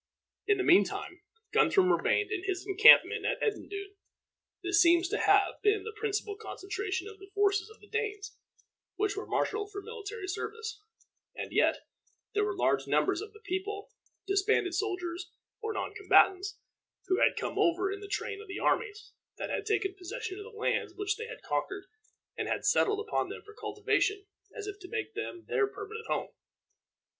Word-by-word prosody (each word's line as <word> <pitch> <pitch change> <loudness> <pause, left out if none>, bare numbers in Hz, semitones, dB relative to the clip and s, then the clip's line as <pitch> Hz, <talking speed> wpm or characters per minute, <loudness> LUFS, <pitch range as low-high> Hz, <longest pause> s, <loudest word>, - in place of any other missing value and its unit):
In 415 -1 +4
the 380 - 0
mean 360 +1 +7
time, 355 0 -6 0.3
Guthrum 370 -2 +4
remained 420 +4 +1
in 380 -4 -2
his 385 -1 -2
encampment 405 +2 +7
at - - 0
Edendune. 400 -2 -3 0.7
This 365 +1 +4
seems 345 0 +5
to 425 - -1
have 400 -1 +3
been 415 -2 +3
the 450 +1 -6
principal 420 -1 -2
concentration 395 -2 -4
of 425 -2 -11
the 390 0 -13
forces 405 0 +2
of 435 - -16
the - - -16
Danes 425 -2 -3 0.6
which 405 0 0
were 410 - -5
marshaled 420 -1 -1
for 405 - -5
military 430 -1 -7
service; 445 +3 -5 0.5
and - - -5
yet - - +2 0.5
there 420 - +2
were 415 -1 -1
large - - +1
numbers 390 -2 +2
of 425 0 -8
the 430 0 -17
people, 405 +1 -4 0.3
disbanded 390 -2 +2
soldiers, 360 -3 -2 0.3
or 440 0 -2
non 425 - -3
combatants, 400 -1 +4 0.5
who 375 0 +1
had - - +4
come - - -3
over 380 0 +2
in 400 - -4
the 405 - -8
train 415 0 -3
of 430 - -12
the 390 - -5
armies, 425 0 0 0.3
that - - -4
had - - -2
taken 405 -3 +1
possession 380 +1 -6
of 410 - -8
the 440 -1 -11
lands - - 0
which 410 +1 -1
they 455 +1 -6
had - - -9
conquered, 385 0 -2 0.5
and - - -3
had - - -2
settled 420 0 +3
upon 430 - -1
them - - -8
for 425 - -14
cultivation, 415 -2 0 0.3
as 420 - -5
if 410 -1 -6
to 370 - -10
make 440 0 -3
them 355 -4 -5
their 410 - +2
permanent 425 +2 -8
home. - - -1
410 Hz, 180 wpm, -30 LUFS, 390-430 Hz, 0.7 s, mean